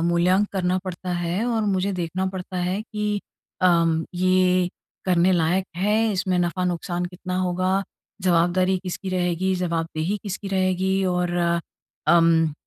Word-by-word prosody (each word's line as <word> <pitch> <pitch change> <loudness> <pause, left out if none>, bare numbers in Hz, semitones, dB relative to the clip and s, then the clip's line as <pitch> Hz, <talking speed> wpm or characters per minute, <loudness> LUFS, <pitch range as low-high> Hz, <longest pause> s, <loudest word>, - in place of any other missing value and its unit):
मूल्यांक 175 +4 +3
करना 185 -1 +1
पड़ता 180 0 -4
है, 175 +4 -1
और 230 -3 0
मुझे 195 -1 0
देखना 180 +1 -2
पड़ता 185 -1 -5
है 180 +3 -1
कि 210 -1 -2 0.4
अम, 165 -3 +3
ये 185 0 +3 0.4
करने 180 0 +3
लायक 175 +2 +2
है 205 +4 +2 0.2
इसमें 185 -1 0
नफ़ा-नुकसान 175 0 -1
कितना 180 +1 -5
होगा? 185 +1 +1 0.4
जवाबदारी 180 +1 +3
किसकी 185 +1 -5
रहेगी, 185 0 0
जवाबदेही 170 0 -1
किसकी 200 0 -5
रहेगी 190 0 +1
और 175 0 0 0.7
अम, 165 -2 +4
185 Hz, 130 wpm, -23 LUFS, 175-190 Hz, 0.7 s, अम